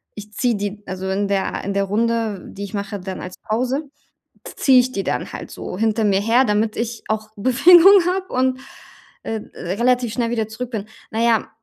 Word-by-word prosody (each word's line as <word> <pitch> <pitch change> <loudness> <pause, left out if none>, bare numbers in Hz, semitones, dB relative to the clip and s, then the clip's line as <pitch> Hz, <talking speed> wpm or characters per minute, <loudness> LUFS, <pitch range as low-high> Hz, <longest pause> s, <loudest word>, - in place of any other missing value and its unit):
ich 210 0 -10
ziehe 240 +2 +1
die 205 0 -4
also 190 +1 -5
wenn 200 +1 0
der 195 -1 0
in - - -5
der - - -4
in 200 - -2
der 200 - +2
Runde, 225 -1 -1
die 200 - -8
ich 200 - -11
mache, 200 0 -4
dann 185 0 -6
als 180 0 -7
Pause, 255 +6 -1 0.7
ziehe 260 -2 +5
ich 250 +1 0
die 195 - -3
dann - - -3
halt - - -7
so 180 - -7
hinter 220 0 +1
mir 195 -1 +3
her, 230 +5 +3
damit 215 -1 +1
ich 230 0 -4
auch 215 0 -2
Bewegung 340 - +7 0.2
habe 375 0 -3
und, 255 0 +1 0.7
äh, 220 -1 -3
relativ 235 +5 0
schnell 235 -2 -1
wieder 225 -2 -1
zurück 245 +3 -6
bin. 210 -2 -4 0.2
Na 225 - -2
ja, 230 -2 +2
220 Hz, 205 wpm, -20 LUFS, 200-245 Hz, 0.7 s, Bewegung